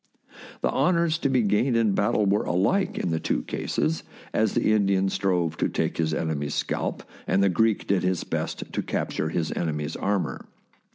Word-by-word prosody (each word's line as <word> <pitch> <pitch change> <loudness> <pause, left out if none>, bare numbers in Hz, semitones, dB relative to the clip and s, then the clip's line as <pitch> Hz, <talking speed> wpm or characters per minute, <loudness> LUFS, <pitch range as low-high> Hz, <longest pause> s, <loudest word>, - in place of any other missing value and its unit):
The - - +1
honours 170 -2 +2
to 140 - +1
be 130 -3 +3
gained 110 +5 +2
in 110 -3 +3
battle 100 +1 +2
were 100 +1 +2
alike 140 - +1
in 85 - -1
the 80 - 0
two - - -1
cases, 80 +2 -1 0.3
as 110 -2 +1
the 110 - +3
Indian 100 -2 +2
strove 90 -5 0
to - - +1
take - - -1
his 80 -1 +1
enemy's 75 -2 -2
scalp, - - -2 0.2
and 95 +1 +3
the 100 - +4
Greek 110 +4 +2
did 100 -2 +1
his 90 -1 0
best - - -3
to - - 0
cap - - -2
ture 80 - -2
his 80 -1 -1
enemy's 75 -2 -2
armour. 100 -1 -2
95 Hz, 185 wpm, -25 LUFS, 80-110 Hz, 0.3 s, the